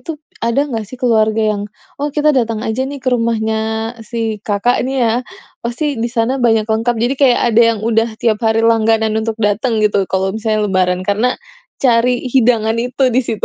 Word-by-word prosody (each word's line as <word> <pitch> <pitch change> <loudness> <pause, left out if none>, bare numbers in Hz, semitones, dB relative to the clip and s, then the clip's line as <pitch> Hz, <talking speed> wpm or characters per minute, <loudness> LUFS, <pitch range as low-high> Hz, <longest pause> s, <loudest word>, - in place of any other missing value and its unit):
itu, 325 -2 -6 0.2
ada 235 +5 +1
enggak 225 -7 -5
sih 255 - -9
keluarga 220 -3 +1
yang, 205 -1 -4 0.4
"Oh 290 - 0
kita 300 0 +3
datang 230 -4 -1
aja 220 +4 -2
nih 285 - -6
ke 255 -1 0
rumahnya 225 -2 0 0.4
si 225 -1 -4
Kakak," 210 +4 0
nih 270 - -2
ya, 225 - +2 0.5
"pasti 250 +2 -3
di 235 - -1
sana 240 +3 -1
banyak 225 -2 +3
lengkap." 225 +2 0
Jadi, 240 +4 0
kayak 255 -3 +4
ada 225 - +5 0.2
yang - - -7
udah 225 0 +2
tiap 220 -2 0
hari 225 0 +1
langganan 225 -1 +2
untuk 225 0 -3
datang 215 +2 +1
gitu 200 -2 +1
kalau 190 0 -1
misalnya 215 -1 -1
lebaran 185 -1 +1
karena 220 +6 0 0.4
cari 245 0 +2
hidangan 230 -3 +2
itu 250 +2 -1
di 255 - +3
situ. 225 -4 -3
225 Hz, 185 wpm, -16 LUFS, 220-245 Hz, 0.5 s, ada